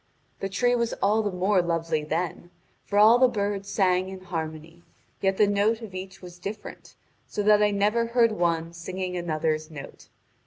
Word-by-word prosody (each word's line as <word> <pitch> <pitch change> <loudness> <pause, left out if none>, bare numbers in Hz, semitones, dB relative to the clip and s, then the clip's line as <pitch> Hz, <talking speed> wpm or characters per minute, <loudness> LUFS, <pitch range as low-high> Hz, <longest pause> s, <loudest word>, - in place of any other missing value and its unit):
The 195 - -3
tree 245 +5 +1
was 235 -1 0
all 210 +3 +2
the 210 - -1
more 185 +1 +2
lovely 165 -2 -1
then, 170 +2 -3 0.4
for 205 - -2
all 220 +4 +7
the 255 - +6
birds 200 -3 -2
sang 185 -2 +1
in 190 -1 -8
harmony, 165 -1 -6 0.4
yet 195 -1 +1
the 210 - +5
note 205 +3 +1
of 210 -4 -9
each 185 0 -8
was 180 0 -11
different, 205 +4 -8 0.3
so 210 - -3
that 210 0 +5
I 210 - +4
never 210 +3 +1
heard 235 -1 +3
one 170 -4 -1
singing 180 +2 -5
another's 155 -2 -1
note. 150 -3 -10
190 Hz, 180 wpm, -26 LUFS, 170-210 Hz, 0.4 s, all